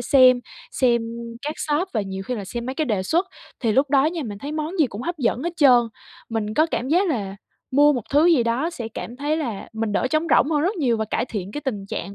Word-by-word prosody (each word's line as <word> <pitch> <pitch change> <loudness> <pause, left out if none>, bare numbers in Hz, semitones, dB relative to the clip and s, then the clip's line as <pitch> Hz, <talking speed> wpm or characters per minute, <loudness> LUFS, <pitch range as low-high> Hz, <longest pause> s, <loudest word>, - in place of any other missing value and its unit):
xem, 255 -1 +5 0.3
xem 240 -3 +2 0.4
các 300 +1 -3
shop 310 +5 0
và 220 - 0
nhiều 195 -1 -5
khi 250 +6 -3
là 205 - -5
xem 235 +4 -5
mấy 260 - -3
cái 310 - 0
đề 210 -7 0
xuất. 340 - +1 0.3
Thì 230 -4 +1
lúc 270 +5 +2
đó 275 -1 +4
nha, 330 0 -2
mình 205 -4 -6
thấy 285 +7 -6
món 315 +4 -3
gì 310 - +5
cũng 220 -1 -7
hấp 345 +4 -4
dẫn 250 0 0
hết 345 - -2
trơn. 255 -5 +6 0.5
Mình 215 -2 -2
có 310 +5 +4
cảm 260 -5 -3
giác 360 +6 +3
là 200 - -2 0.3
mua 290 +2 +5
một 250 -5 -2
thứ 295 +4 +4
gì 325 -8 +5
đó 240 +8 0
sẽ 240 -10 -6
cảm 240 - -6
thấy 295 +3 -1
là 240 -11 -4
mình 220 -1 -2
đỡ 230 - +1
trống 310 +1 +1
rỗng 295 - +4
hơn 300 -2 +2
rất 380 +6 +1
nhiều 250 -8 +1
và 220 - -1
cải 215 - -1
thiện 205 -5 -5
cái 295 - -4
tình 210 -9 -4
trạng 200 0 -5
255 Hz, 260 wpm, -23 LUFS, 225-305 Hz, 0.5 s, trơn